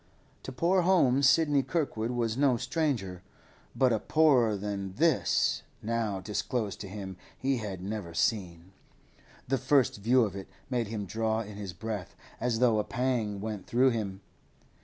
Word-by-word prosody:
To - - -7
poor 175 +8 +2
homes 140 -7 +4
Sidney 150 -3 +3
Kirkwood 135 -5 -2
was 120 -2 -1
no 135 -2 +3
stranger, 125 - -2 0.5
but 130 -3 +3
a 110 - +1
poorer 130 -9 +3
than 100 -1 -4
this 160 -1 +2 0.2
now 110 -3 -1
disclosed 105 +1 -3
to 100 - -6
him 95 -2 -7 0.2
he 135 0 0
had 100 -5 -5
never 100 -4 -5
seen. 90 -5 -1 0.8
The 135 +1 +1
first 135 -2 +2
view 120 +5 +3
of 100 -3 -6
it 95 -1 -7 0.2
made 120 -3 0
him 105 -1 -4
draw 110 +3 -1
in 105 -1 -8
his 100 -3 -6
breath, 105 0 -5 0.2
as 120 -1 0
though 115 -3 +3
a - - +1
pang 120 -6 -1
went 105 -3 -5
through 130 +2 +4
him. 100 -4 -3
115 Hz, 160 wpm, -29 LUFS, 100-130 Hz, 0.8 s, homes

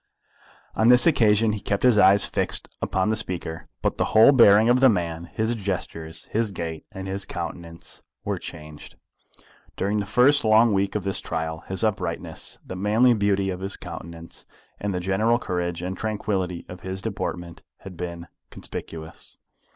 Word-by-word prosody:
On 110 +2 +3
this 125 0 +7
occasion 110 -7 +4
he 105 - -3
kept 100 -1 -2
his 125 -4 +5
eyes 100 +1 +6
fixed - - 0
upon 95 +2 0
the - - +1
speaker. 85 -5 -2 0.2
But - - -1
the - - +2
whole 110 +5 +9
bearing 110 -4 +6
of 120 +1 +4
the 135 0 +6
man, 85 -5 -2
his 110 +6 -1
gestures, 90 -6 -5
his 110 0 0
gait, 80 -4 -6
and 95 -1 -7
his 100 +1 -3
countenance 85 -1 -7 0.2
were - - -2
changed. 75 0 -10 0.8
During 100 +2 -1
the 100 -1 -2
first 130 +7 +4
long 110 0 +5
week 100 +1 0
of 105 - -1
his 95 -1 -2
trial, 80 0 -3
his 95 +1 -2
uprightness, 105 -4 -2
the 95 - -7
manly 110 +6 +3
beauty 100 -2 +1
of 90 - -5
his 95 +1 -2
countenance, 85 0 -9 0.3
and 105 - -2
the 90 - -2
general 100 +6 +1
courage 90 -5 -3
and 95 +1 -3
tranquillity 95 -5 -3
of 90 0 -10
his 95 +1 -5
deportment 85 -1 -5 0.2
had 95 -2 -10
been 85 -1 -6 0.2
conspicuous. 80 0 -8
95 Hz, 165 wpm, -24 LUFS, 85-110 Hz, 0.8 s, whole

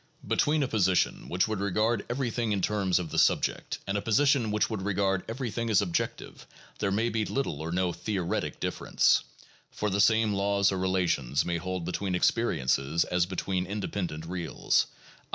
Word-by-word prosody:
Between 150 0 +2
a - - 0
position 95 -6 +1
which 90 +4 +1
would 110 -2 -2
regard 105 +3 0
every 125 0 -1
thing 115 -2 -1
in 100 - -1
terms 100 -4 +1
of 85 -3 -3
the - - +1
subject - - +1
and 100 - -2
a 100 - 0
position 130 +1 +3
which 105 0 +1
would 110 -4 -4
regard 95 -1 0
every 120 0 -3
thing 115 +1 -2
as 105 - +4
objective, 90 -5 -3 0.3
there 100 - 0
may 110 +4 +1
be 110 -1 0
very - - -5
little 110 - -1
or 80 +1 -4
no 90 0 0
theoretic 95 -5 -2
difference, - - +2 0.5
for 105 -1 -2
the 100 +1 +2
same 110 0 +4
laws 100 0 +2
or 95 - -2
relations 90 -8 +1
may 85 0 -1
hold 90 0 -4
between 90 +1 -2
"experiences" 80 - +1
as 90 0 0
between 95 0 -2
"independent 95 -5 -4
reals," 85 -2 0 0.4
i. - - -34
100 Hz, 185 wpm, -28 LUFS, 90-110 Hz, 0.5 s, as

